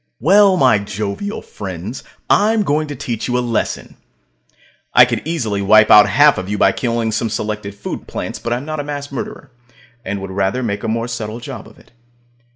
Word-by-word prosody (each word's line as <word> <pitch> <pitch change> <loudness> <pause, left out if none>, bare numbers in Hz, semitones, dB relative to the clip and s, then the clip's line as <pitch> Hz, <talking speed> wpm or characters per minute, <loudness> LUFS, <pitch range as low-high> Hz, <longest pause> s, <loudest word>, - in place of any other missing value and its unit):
Well, 195 +3 +5
my 125 - +4
jovial 100 - -5
friends, 95 +4 -7 0.2
I'm 215 +1 +3
going 155 -2 0
to 145 - -6
teach 120 -3 -4
you 125 0 0
a - - +1 0.2
lesson. - - -4 1.0
I - - +9
could - - -2
easily 115 -12 -2
wipe 110 +2 +5
out 105 -1 +8
half 145 +6 +5
of 95 +1 -6
you 105 - -2
by 95 - +4
killing 115 0 -1
some 115 +1 -1
selected 105 -1 -4
food 100 - -7
plants, - - -5
but 120 - -5
I'm 125 +4 -2
not 155 0 -4
a - - -2
mass 145 -1 -6
murderer, 135 +1 -7 0.5
and 100 -1 -4
would 95 0 -7
rather 100 +6 -1
make 100 -3 -2
a - - -2
more 115 +1 -1
subtle 115 -1 -5
job 120 - -8
of - - -18
it. - - -22
115 Hz, 195 wpm, -18 LUFS, 100-145 Hz, 1.0 s, I